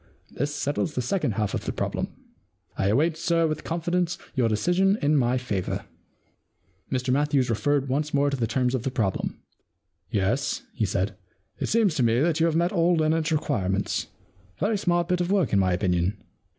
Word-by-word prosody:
This 145 +3 -2
settles 145 +2 -2
the 125 - 0
second 125 - 0
half 105 -1 -1
of - - -3
the - - -1
problem. - - -2 0.7
I 95 - 0
await, 155 +10 +2
sir, 170 0 +2
with 155 -1 -2
confidence, 175 +1 -1 0.2
your 120 -3 +2
decision 180 - +2
in 145 +1 +2
my 125 -2 +2
favour.* 105 -7 -3 1.1
Mr 125 0 0
Matthews 140 -3 +2
referred 140 +4 +1
once 145 +3 -1
more 140 0 +2
to - - 0
the 120 -4 -1
terms 125 +2 0
of 130 - 0
the 135 - -1
problem. 110 -7 -2 0.3
* - - -52 0.3
Yes,* 110 +8 0
he 115 - 0
said, 100 +2 -1 0.2
* 95 - -41
it - - -1
seems 220 -6 +3
to - - +2
me 115 +1 +3
that 160 +2 +2
you 165 - +4
have 160 - 0
met 170 +2 +2
all 175 -1 +3
Leonardos 160 +1 +1
requirements. 100 -11 0 0.5
Very 215 +3 +1
smart 175 -2 +1
bit 180 -1 +1
of 175 - -1
work, 195 - +2
in 100 - +5
my 95 -1 +2
opinion. 90 +1 +1
145 Hz, 190 wpm, -26 LUFS, 115-165 Hz, 1.1 s, in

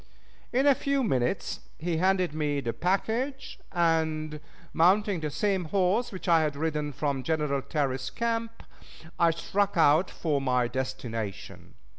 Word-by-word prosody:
In 265 +3 +2
a 285 - +7
few 280 +1 0
minutes 130 - 0 0.2
he 165 0 -2
handed 185 -1 +2
me 150 -2 -1
the 120 -4 -3
package, 235 - -1
and, 160 -3 0 0.3
mounting 190 +3 +3
the 155 -1 -3
same 190 +3 0
horse 195 +7 +1
which 190 -1 -7
I 165 -2 +5
had 150 -2 -1
ridden 150 -1 -2
from 140 -1 -2
General 150 -2 0
Terry's 135 -3 -2
camp, 230 -1 -3 0.6
I 170 - +5
struck 195 +4 -1
out 160 +3 +5
for 150 -4 -1
my 125 -2 +1
destination. 120 -5 -5
160 Hz, 140 wpm, -28 LUFS, 145-195 Hz, 0.6 s, a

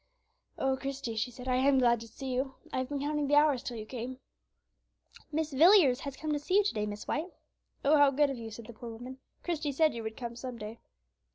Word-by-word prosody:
"Oh, 265 0 +1
Christie," 270 -4 -4
she 220 +3 -1
said, 250 +1 -10
"I 255 -1 +2
am 270 +1 +4
glad 240 -2 +4
to 230 - -9
see 265 +2 -6
you; 265 +1 -2 0.2
I - - 0
have 255 - -3
been 285 -1 -3
counting 295 0 0
the 290 - +3
hours 295 -4 +4
till 240 - -5
you 215 - -6
came." 250 +2 -6 1.1
"Mrs. 305 -3 -2
Villiers 330 -7 +7
has 280 -2 -6
come 310 -1 -3
to 295 - 0
see 365 +6 -1
you 415 - +6
to 400 - 0
day, 210 -2 -1
Mrs. 205 0 -6
White." 325 +5 -2 0.5
"Oh! 300 +2 +6
how 285 -1 +7
good 280 +1 +2
of 270 - -5
you," 225 -1 -6
said 225 +1 -9
the 235 - -10
poor 235 +2 -8
woman; 245 +3 -8 0.2
"Christie 310 -4 -1
said 310 +2 +3
you 230 - -5
would 220 0 -6
come 235 -1 -5
some 250 0 -6
day." 215 +1 -8
265 Hz, 245 wpm, -31 LUFS, 235-290 Hz, 1.1 s, Villiers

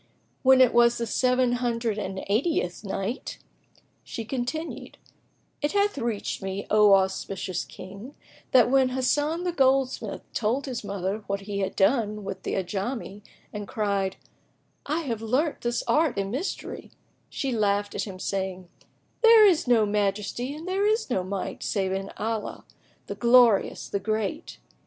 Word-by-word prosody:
When 260 0 +6
it 255 - +5
was 235 0 +5
the 235 - -2
Seven 250 +2 +2
Hundred 235 -3 -1
and 190 -2 -4
Eightieth 205 - 0
Night, 200 +4 -4 0.7
She 230 - -6
continued, 265 +7 -4 0.6
It 295 - 0
hath 410 0 +2
reached 230 -4 -3
me, 195 +1 -4
O 210 -1 +7
auspicious 190 -1 -1
King, 200 +9 -11 0.4
that 250 -1 +5
when 265 -1 +4
Hasan 290 +6 0
the 360 - 0
goldsmith 270 -4 +1
told 235 +5 0
his 255 -5 -5
mother 200 0 -3
what 200 0 -2
he 200 0 -4
had 195 - -2
done 210 0 +1
with 190 -1 -6
the - - -3
Ajami 200 +3 -4 0.3
and 205 -1 -5
cried, 200 -3 -1 0.7
"I 310 +4 0
have 235 -8 -3
learnt 260 +8 0
this 240 0 -1
art 305 -7 +2
and 195 0 -2
mystery," 290 - -4 0.4
she 275 - -3
laughed 205 -2 0
at - - -2
him, 190 -2 -7
saying, 190 -1 -3 0.5
"There 455 -2 +8
is 355 -7 +3
no 230 -3 +4
Majesty 210 +6 -1
and 320 +4 -9
there 390 +2 +1
is 440 - 0
no 190 -6 +1
Might 190 +1 -4
save 195 -3 -1
in 195 +1 -3
Allah, 220 -1 -4 0.4
the - - -5
Glorious, 235 -4 +4
the 200 - -2
Great!" 215 0 -3
225 Hz, 150 wpm, -26 LUFS, 200-260 Hz, 0.7 s, There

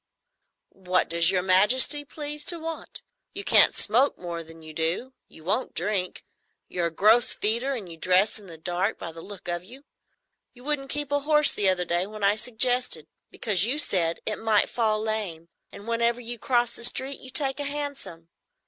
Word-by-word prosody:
"What 185 -1 -1
does 170 0 +4
Your 185 -1 0
Majesty 210 +10 +5
please 295 0 -5
to 345 - +3
want? 325 0 -7 0.3
You 400 - -5
can't - - +5
smoke 250 +7 +1
more 170 -2 -7
than 165 0 -15
you 155 0 -11
do; 165 +12 -3
you 160 - -16
won't 210 +9 -2
drink; 185 0 -2 0.4
you're 175 -1 -2
a - - -7
gross 220 +8 +4
feeder; 235 +6 0
and 220 -8 -6
you 165 -1 -11
dress 185 +6 +1
in 200 - -16
the 165 -2 -11
dark, 180 +6 -2
by 165 - -7
the 165 0 -12
look 195 0 -10
of 175 0 -4
you. 255 +9 -12 0.7
You 245 - -15
wouldn't 280 -1 -3
keep 295 -1 -2
a 285 - +1
horse 300 +1 +4
the 200 -2 0
other 180 -1 -1
day 175 +2 -1
when 215 0 -9
I 200 +1 +4
suggested, 245 - 0 0.2
because, 200 -4 +1
you 265 +5 -1
said, 175 - +1
it 215 - -3
might 220 -2 +1
fall 220 -3 0
lame, 210 -7 -4 0.2
and 205 - -13
whenever 235 +1 0
you 240 -1 -4
cross 240 -1 0
the - - -5
street 265 +3 +2
you 260 - -10
take 270 0 +2
a - - -2
hansom. 280 - -5
215 Hz, 195 wpm, -25 LUFS, 180-260 Hz, 0.7 s, Majesty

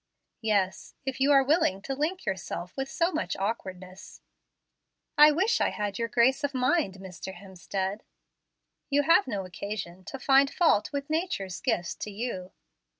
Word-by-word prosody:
"Yes, 205 -4 0
if 265 0 -3
you 275 +2 +4
are 275 -1 +6
willing 285 - +2
to 270 - -3
link 315 +7 -2
yourself 180 -1 -4
with 270 0 -3
so 340 +1 +1
much 315 - -2
awkwardness." 190 -3 -5 0.9
"I 300 0 +9
wish 390 +9 +2
I - - +3
had 205 -1 -3
your 230 - 0
grace 255 +5 +3
of 285 -1 -1
mind, 255 - +1
Mr. 190 0 -8
Hemstead." 190 +2 -4 0.9
"You 290 0 +3
have 330 +4 +5
no 200 -6 -3
occasion 185 0 -6
to 270 - -6
find 270 +1 +4
fault 315 - +3
with 280 -1 -3
nature's 310 - -2
gifts 175 0 0
to - - -5
you." 200 -4 -5
230 Hz, 155 wpm, -28 LUFS, 190-285 Hz, 0.9 s, I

